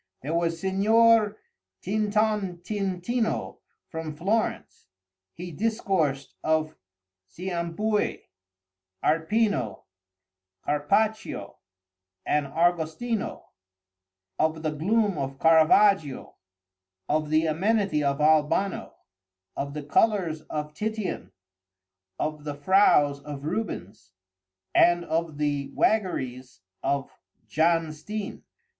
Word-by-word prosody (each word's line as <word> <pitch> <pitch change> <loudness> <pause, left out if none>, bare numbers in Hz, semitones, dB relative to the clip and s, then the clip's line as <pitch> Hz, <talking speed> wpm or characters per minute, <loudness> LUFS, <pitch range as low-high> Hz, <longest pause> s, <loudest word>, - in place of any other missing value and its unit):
There 150 +4 -3
was 170 0 0
Signor 215 +3 +4 0.5
Tintontintino 210 +1 -1 0.3
from 160 -2 -6
Florence. 200 - -2 0.4
He 175 +1 -8
discoursed 170 - -1
of 155 0 +1 0.5
Cimabué, 180 - -2 0.8
Arpino, 160 - +1 0.8
Carpaccio, 150 - 0 0.7
and 150 -1 +1
Argostino—of 145 - -3
the 155 - 0
gloom 200 +4 +1
of 135 0 -4
Caravaggio, 160 0 +4 0.7
of 155 0 0
the 155 +1 +3
amenity 190 0 +1
of 140 0 0
Albano, 155 +5 +2 0.6
of 140 +1 -4
the 150 - -4
colors 170 -1 +1
of 150 0 -4
Titian, 215 +2 -4 0.9
of 150 -1 -3
the 145 -1 -4
frows 145 -3 +4
of 145 -1 -8
Rubens, 110 - -5 0.6
and 175 0 +4
of 160 -1 -2
the 145 -2 -1
waggeries 130 - -1 0.2
of 140 -1 -1 0.3
Jan 165 0 +1
Steen. 205 +7 -6
160 Hz, 85 wpm, -26 LUFS, 145-200 Hz, 0.9 s, Signor